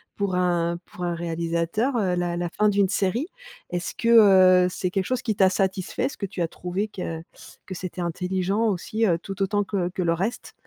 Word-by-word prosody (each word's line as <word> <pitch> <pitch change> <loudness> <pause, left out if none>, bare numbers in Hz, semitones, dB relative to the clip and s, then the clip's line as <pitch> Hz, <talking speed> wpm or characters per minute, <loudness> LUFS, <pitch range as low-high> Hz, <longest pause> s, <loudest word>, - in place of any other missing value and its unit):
pour 200 -2 -1
un 170 -1 +1
pour 180 - -9
un 175 - 0
réalisateur, 170 +8 -1 0.2
la 175 -1 -1
la 175 -1 -2
fin 210 +4 +2
d'une 200 -2 +2
série? 215 - 0 0.4
Est-ce 175 0 -3
que, 190 -6 +6
heu, - - +2
c'est 180 - -2
quelque 190 0 -1
chose 255 0 -1
qui 220 -3 -1
t'a 190 -1 +5
satisfait? 190 +4 -1
Est-ce 275 - -4
que 200 - -3
tu 185 - -5
as 170 - +1
trouvé 180 +5 -3
que 165 -5 -5 0.5
que 185 - -6
c'était 180 0 -6
intelligent 185 +4 -1
aussi, 215 +3 -1
heu, 170 -4 +2
tout 195 +2 -7
autant 205 +1 +1
que 190 -3 -2
que 185 - -4
le 165 - +2
reste 195 +8 -3
185 Hz, 205 wpm, -24 LUFS, 175-205 Hz, 0.5 s, que